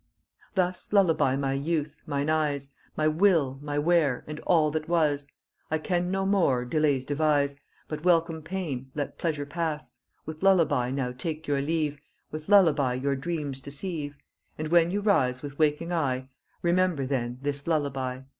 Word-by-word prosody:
Thus 180 Hz, -1 st, -1 dB
lullaby 165 Hz, -9 st, +3 dB
my 135 Hz, -1 st, -1 dB
youth, 150 Hz, +1 st, -2 dB
mine 145 Hz, -1 st, -1 dB
eyes, 145 Hz, -3 st, 0 dB, 0.3 s
My 155 Hz, -, +2 dB
will, 155 Hz, -5 st, +3 dB
my 145 Hz, 0 st, -3 dB
ware, 150 Hz, -4 st, +2 dB
and 150 Hz, 0 st, -7 dB
all 155 Hz, -4 st, +4 dB
that 155 Hz, +1 st, -3 dB
was, 150 Hz, -4 st, +1 dB, 0.4 s
I 155 Hz, -, +1 dB
can 175 Hz, +2 st, -1 dB
no 195 Hz, +1 st, 0 dB
mo 175 Hz, -11 st, +2 dB
delays 140 Hz, 0 st, +1 dB
devise, 145 Hz, -1 st, +1 dB, 0.3 s
But 155 Hz, 0 st, -5 dB
welcome 165 Hz, -2 st, +2 dB
pain, 155 Hz, -7 st, -4 dB
let 145 Hz, -2 st, -4 dB
pleasure 150 Hz, -4 st, -1 dB
pass: 150 Hz, -4 st, -3 dB, 0.3 s
With 155 Hz, 0 st, -7 dB
lullaby 165 Hz, -10 st, +3 dB
now 130 Hz, -1 st, -2 dB
take 155 Hz, +5 st, -5 dB
your 140 Hz, -1 st, +1 dB
leave, 150 Hz, -1 st, -1 dB, 0.3 s
With 155 Hz, +2 st, -7 dB
lullaby 155 Hz, -11 st, +5 dB
your 140 Hz, +2 st, 0 dB
dreams 145 Hz, -2 st, -4 dB
deceive, 145 Hz, 0 st, -5 dB, 0.4 s
And 155 Hz, 0 st, -3 dB
when 170 Hz, 0 st, +5 dB
you 200 Hz, +3 st, -1 dB
rise 130 Hz, -12 st, +2 dB
with 145 Hz, 0 st, -8 dB
waking 155 Hz, +3 st, +1 dB
eye, 130 Hz, -5 st, -1 dB, 0.3 s
Remember 175 Hz, -4 st, +2 dB
then 125 Hz, -2 st, -2 dB
this 140 Hz, 0 st, -2 dB
lullaby. 135 Hz, -5 st, -1 dB
150 Hz, 155 wpm, -27 LUFS, 140-165 Hz, 0.4 s, lullaby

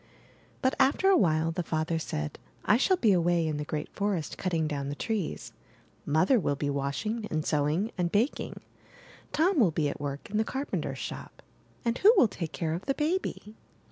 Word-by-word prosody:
But 260 Hz, -, +3 dB
after 275 Hz, +8 st, +4 dB
a 390 Hz, -, +6 dB
while 160 Hz, -, +2 dB
the 180 Hz, +2 st, -2 dB
father 160 Hz, 0 st, -1 dB
said: 75 Hz, -, -4 dB, 0.3 s
*1 215 Hz, -, +5 dB
shall 375 Hz, +7 st, +3 dB
be 225 Hz, -10 st, +3 dB
away 175 Hz, -2 st, +2 dB
in 155 Hz, -2 st, -1 dB
the 150 Hz, -, -2 dB
great 150 Hz, 0 st, -4 dB
forest 200 Hz, -6 st, -1 dB
cutting 165 Hz, -4 st, -1 dB
down 140 Hz, -2 st, -3 dB
the 145 Hz, -, -4 dB
trees; 210 Hz, -1 st, -3 dB, 0.5 s
Mother 180 Hz, -, +4 dB
will 145 Hz, -6 st, 0 dB
be 145 Hz, 0 st, -2 dB
washing 140 Hz, -, -2 dB
and 155 Hz, -1 st, -2 dB
sewing 155 Hz, +8 st, +1 dB
and 170 Hz, -1 st, +1 dB
baking; 230 Hz, +7 st, -1 dB, 0.7 s
Tom 340 Hz, +1 st, +2 dB
will 210 Hz, -8 st, +5 dB
be 155 Hz, -2 st, 0 dB
at 140 Hz, -, -6 dB
work 140 Hz, -1 st, -4 dB
in 210 Hz, -, 0 dB
the 220 Hz, -, +3 dB
carpenter's 270 Hz, +5 st, -3 dB
shop; -, -, -7 dB, 0.4 s
and 235 Hz, +1 st, 0 dB
who 415 Hz, -, +8 dB
will 245 Hz, -, +7 dB
take 170 Hz, -5 st, -5 dB
care 160 Hz, -2 st, -2 dB
of 175 Hz, +7 st, -5 dB
the 275 Hz, -, +1 dB
baby?'' 305 Hz, -, -2 dB
175 Hz, 190 wpm, -29 LUFS, 155-230 Hz, 0.7 s, who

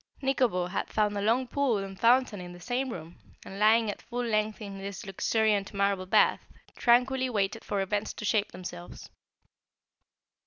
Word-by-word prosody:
Nikobo 255 Hz, -9 st, +1 dB
had 185 Hz, -, -3 dB
found 210 Hz, -1 st, +1 dB
a 200 Hz, -, -2 dB
long 230 Hz, +5 st, +2 dB
pool 270 Hz, -3 st, +1 dB
and 195 Hz, -1 st, -6 dB
fountain 235 Hz, -4 st, +3 dB
in 175 Hz, 0 st, -8 dB
the 175 Hz, -, -12 dB
same 250 Hz, +6 st, -2 dB
room 170 Hz, -5 st, -8 dB, 0.3 s
and, 195 Hz, -, -8 dB
lying 220 Hz, +2 st, +5 dB
at -, -, -11 dB
full 245 Hz, +1 st, -4 dB
length 215 Hz, -1 st, 0 dB
in 200 Hz, -2 st, -7 dB
this 195 Hz, 0 st, -7 dB
luxuriant 205 Hz, +1 st, 0 dB
marble 200 Hz, -1 st, 0 dB
bath, -, -, +4 dB, 0.3 s
tranquilly 255 Hz, +2 st, +3 dB
waited 210 Hz, 0 st, -1 dB
for 200 Hz, -1 st, -1 dB
events 205 Hz, +2 st, -1 dB
to -, -, -7 dB
shape 210 Hz, 0 st, +1 dB
themselves. 175 Hz, -1 st, -9 dB
210 Hz, 165 wpm, -28 LUFS, 195-235 Hz, 0.3 s, lying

